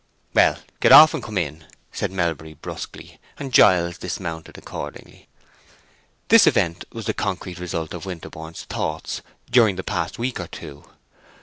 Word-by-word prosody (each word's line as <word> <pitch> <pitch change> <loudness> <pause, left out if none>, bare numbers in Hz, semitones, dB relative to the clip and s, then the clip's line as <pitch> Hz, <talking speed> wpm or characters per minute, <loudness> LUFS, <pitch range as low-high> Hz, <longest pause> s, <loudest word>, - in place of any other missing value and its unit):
"Well, - - +4 0.2
get - - +4
off 155 +1 +10
and 160 - -3
come 110 -2 -5
in," 80 -2 -3 0.3
said - - -3
Melbury, 80 -4 -2
brusquely; 75 - -9 0.2
and 135 -3 -6
Giles 85 -6 +5
dismounted 80 -1 -6
accordingly. - - -9 1.0
This - - +7
event 85 +1 +1
was 115 -2 -7
the 110 - 0
concrete 90 -3 -4
result 80 -3 -4
of 90 +2 -7
Winterborne's 80 -2 -8
thoughts - - -4 0.3
during 115 -5 +5
the 95 - -5
past 85 -2 -3
week 120 +1 -2
or - - -5
two. 70 0 -10
90 Hz, 145 wpm, -22 LUFS, 80-105 Hz, 1.0 s, off